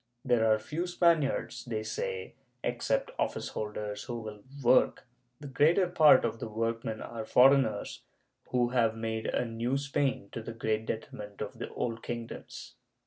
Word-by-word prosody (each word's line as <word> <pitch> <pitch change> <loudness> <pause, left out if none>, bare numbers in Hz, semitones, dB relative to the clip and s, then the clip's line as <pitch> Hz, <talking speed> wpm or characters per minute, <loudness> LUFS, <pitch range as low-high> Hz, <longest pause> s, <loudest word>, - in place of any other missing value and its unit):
There 115 -3 +3
are 110 - +5
few 150 +11 -4
Spaniards, 170 -5 +1
they 110 -3 -3
say, 470 - -4 0.3
except - - 0
office - - -1
holders, 105 -1 -4
who 120 -2 -4
will 110 -2 -8 0.2
work; 125 +2 +4 0.3
the 150 - -10
greater 155 +8 +4
part 160 -4 +6
of 115 - -2
the - - -4
workmen 115 0 -2
are 115 -1 -6
foreigners, 125 -3 +4 0.5
who 125 -1 +2
have 115 -3 +2
made 110 0 -3
a - - 0
new 115 +3 -1
Spain, 140 -6 -1
to 115 - -5
the 115 +1 -7
great 110 -1 -1
detriment 105 -2 -6
of - - -6
the - - -4
old 115 -1 -2
kingdoms. 120 -1 -7
115 Hz, 155 wpm, -30 LUFS, 110-140 Hz, 0.5 s, part